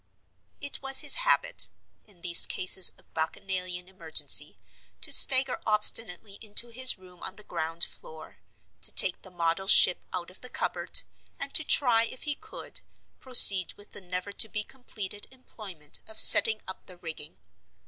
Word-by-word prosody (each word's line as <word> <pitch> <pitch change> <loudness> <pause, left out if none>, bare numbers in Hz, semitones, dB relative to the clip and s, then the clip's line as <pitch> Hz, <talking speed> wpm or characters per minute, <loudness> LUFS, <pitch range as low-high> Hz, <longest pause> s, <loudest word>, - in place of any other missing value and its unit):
It 285 - -4
was 270 0 -1
his - - +3 0.2
habit, - - +1 0.4
in 190 -5 -23
these 170 -2 +5
cases 185 0 +4
of - - -28
Bacchanalian 180 +2 -5
emergency, 170 -4 +1 0.4
to - - -2
stagger 260 -1 +3
obstinately 210 -2 0
into 220 +2 -4
his 255 +1 +2
room 180 -1 -20
on 190 - -9
the 210 - -13
ground 165 0 -6
floor, 155 0 -12 0.4
to - - -3
take 185 - +4
the 190 - -15
model 175 +1 -3
ship 180 -2 +5
out 180 -1 -7
of 185 - -16
the 250 - -7
cupboard, - - -3 0.4
and 275 0 -6
to 315 - +1
try 240 -6 +2
if 255 - -10
he 300 - -3
could - - -9 0.4
proceed 200 -8 +4
with 205 - -18
the - - -9
never 180 +2 -7
to 220 +2 +2
be 210 0 -6
completed 210 -5 -8
employment 200 - -9
of 220 - -13
setting 220 -1 +6
up 190 - -11
the 180 - -14
rigging. 160 -3 -10
195 Hz, 160 wpm, -26 LUFS, 180-230 Hz, 0.4 s, setting